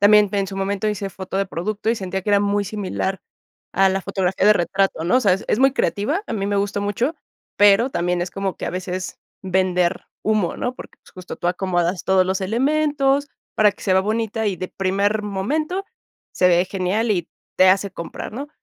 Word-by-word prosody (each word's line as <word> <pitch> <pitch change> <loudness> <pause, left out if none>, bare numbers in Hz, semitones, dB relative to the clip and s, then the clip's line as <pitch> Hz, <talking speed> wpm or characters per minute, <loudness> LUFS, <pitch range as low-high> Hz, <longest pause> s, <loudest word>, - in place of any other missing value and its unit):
También 205 0 +6
en 200 -1 0
su 195 0 -7
momento 200 +2 -1
hice 200 -2 -3
foto 190 +1 -6
de 195 - +2
producto 210 +6 -2
y - - +2
sentía 190 -2 -4
que 205 - -2
era 200 0 +5
muy 205 0 +1
similar 195 -1 -3 0.5
a 195 0 +4
la 195 - -1
fotografía 190 0 0
de 210 - +7
retrato, 190 -2 0
¿no? 215 +9 +3
O - - +4
sea, 195 -6 +4
es 195 - -6
es 210 - +2
muy 270 0 +5
creativa, 275 - 0
a - - -5
mí 200 -2 -2
me 205 0 0
gustó 200 0 -1
mucho, 230 +10 -1 0.4
pero 205 +5 +5
también 175 -3 0
es 180 - -4
como 195 -1 -3
que - - -5
a - - -2
veces 185 0 -5 0.2
vender 185 -1 0 0.2
humo, 215 -5 0
¿no? 250 - -2
Porque - - -12
pues - - -20
justo 185 -1 -8
tú 175 - -4
acomodas 180 -1 -1
todos 190 -1 +4
los 190 +1 -1
elementos 280 +5 +1 0.3
para 210 -1 +5
que - - -16
se 190 - +1
vea 190 - +5
bonita 220 +1 -1
y 195 -3 0
de 185 - -5
primer 200 +3 0
momento 305 - -2 0.5
se 180 - +4
ve 175 +1 +4
genial 195 +4 -1
y 175 -4 0 0.3
te 185 0 +6
hace 195 +1 +3
comprar, 170 +4 -7
¿no? 280 +5 -6
195 Hz, 215 wpm, -21 LUFS, 185-215 Hz, 0.5 s, de